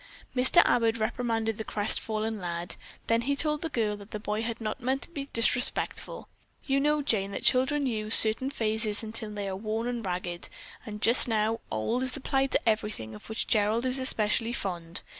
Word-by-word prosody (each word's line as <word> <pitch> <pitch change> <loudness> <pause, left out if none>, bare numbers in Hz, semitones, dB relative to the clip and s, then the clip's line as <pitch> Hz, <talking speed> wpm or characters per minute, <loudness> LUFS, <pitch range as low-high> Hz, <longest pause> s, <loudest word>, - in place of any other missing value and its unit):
Mr. 260 +7 +5
Abbott 230 -1 +2
reprimanded 225 -1 -1
the - - -2
crestfallen 215 +1 -1
lad, 175 -1 -4 0.3
then 230 0 +2
he 280 +4 0
told 300 0 0
the 325 - -3
girl 220 -7 -1
that 205 0 -13
the 210 - -6
boy 210 +1 -2
had 230 0 -3
not 220 +3 -4
meant 260 +3 -1
to - - -11
be 285 -5 -5
disrespectful. 245 +2 0 0.4
"You 275 -1 +1
know, 300 +1 +1
Jane, 200 -7 +2
that - - -5
children 275 +3 +3
use 215 -3 +5
certain 225 +5 +7
phrases 220 -4 0
until 220 0 -4
they 205 -1 -5
are 190 - -3
worn 225 +4 -3
ragged, 180 -3 -4 0.4
and 210 0 -7
just 235 +3 +4
now 220 0 0
'old' 110 - -1
is 260 +1 -2
applied 270 0 0
to - - 0
everything 210 - -1
of 105 - -12
which 220 - -2
Gerald 220 +2 +1
is 260 +1 -1
especially 230 -2 0
fond. 175 -6 -3
225 Hz, 185 wpm, -28 LUFS, 210-250 Hz, 0.4 s, certain